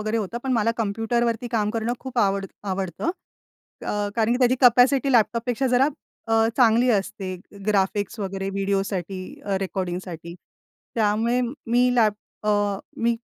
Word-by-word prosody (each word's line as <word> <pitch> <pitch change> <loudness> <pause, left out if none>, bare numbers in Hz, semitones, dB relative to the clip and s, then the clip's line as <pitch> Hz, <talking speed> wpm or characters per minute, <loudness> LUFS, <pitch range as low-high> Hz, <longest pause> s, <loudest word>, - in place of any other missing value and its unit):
वगैरे 215 +1 -1
होतं. 225 +1 -2
पण 265 - 0
मला 230 -2 +2
कॉम्प्युटरवरती 225 +2 0
काम 210 -2 +1
करणं 230 +1 -1
खूप 260 -2 -5
आवड 195 -2 +2 0.3
आवडतं 190 - -2 0.8
अ, - - -1 0.2
कारण 225 0 +2
की 245 - +1
त्याची 250 -1 +4
कॅपॅसिटी 260 +2 +5
लॅपटॉपपेक्षा 240 +2 +2
जरा 255 +2 +5 0.4
अ, 225 0 +3
चांगली 240 0 +4
असते. 195 -3 -1 0.3
ग्राफिक्स 205 +1 0
वगैरे 195 0 -3
व्हिडिओसाठी 195 -1 -2 0.2
अ, 200 -1 0
रेकॉर्डिंगसाठी. 180 -3 -4 0.6
त्यामुळे 225 +3 +2 0.3
मी 245 +2 +3
लॅप 220 -4 +4 0.3
अ, 205 -1 +1 0.2
मी 235 0 +2
220 Hz, 135 wpm, -24 LUFS, 195-240 Hz, 0.8 s, कॅपॅसिटी